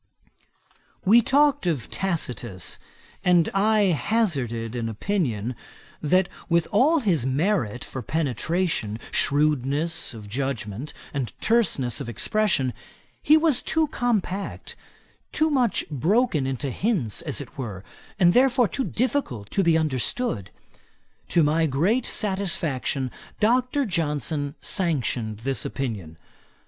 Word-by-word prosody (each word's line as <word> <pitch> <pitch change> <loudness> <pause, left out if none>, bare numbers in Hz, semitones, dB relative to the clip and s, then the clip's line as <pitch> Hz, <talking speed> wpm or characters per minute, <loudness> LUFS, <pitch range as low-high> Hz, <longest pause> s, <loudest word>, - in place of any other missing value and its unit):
We 225 +5 +7
talked 285 -3 +3
of 145 -10 -1
Tacitus, 125 - -3 0.4
and 175 -3 +4
I 205 0 +3
hazarded 135 - -1
an 115 -2 -2
opinion, 120 - -2 0.5
that 185 +4 +3 0.2
with 170 -1 +2
all 290 +9 +4
his 180 - +1
merit 135 - 0
for 130 - -6
penetration, 155 - -1
shrewdness 145 +1 +1
of 105 -2 -9
judgement, 125 +1 -4 0.2
and 135 -4 -2
terseness 170 - +1
of - - -5
expression, 140 - +1 0.5
he 310 - +6
was 315 -5 +3
too 320 -2 0
compact, 205 -7 -2 0.6
too 315 0 +1
much 250 -7 +1
broken 160 - +1
into 135 +1 -2
hints, 170 - 0
as - - -1
it - - -9
were, 100 -7 -5 0.4
and 175 -2 +5
therefore 250 -1 +4
too 265 - -2
difficult 220 - -2
to 195 - +2
be 170 -3 +4
understood. 150 - -1 0.8
To 170 - +3
my 160 +2 +2
great 185 - +1
satisfaction, 165 - -1 0.3
Dr. 255 +5 +2
Johnson 150 - -1
sanctioned 125 - 0
this 135 -1 -1
opinion. 100 - -4
160 Hz, 115 wpm, -24 LUFS, 125-210 Hz, 0.8 s, We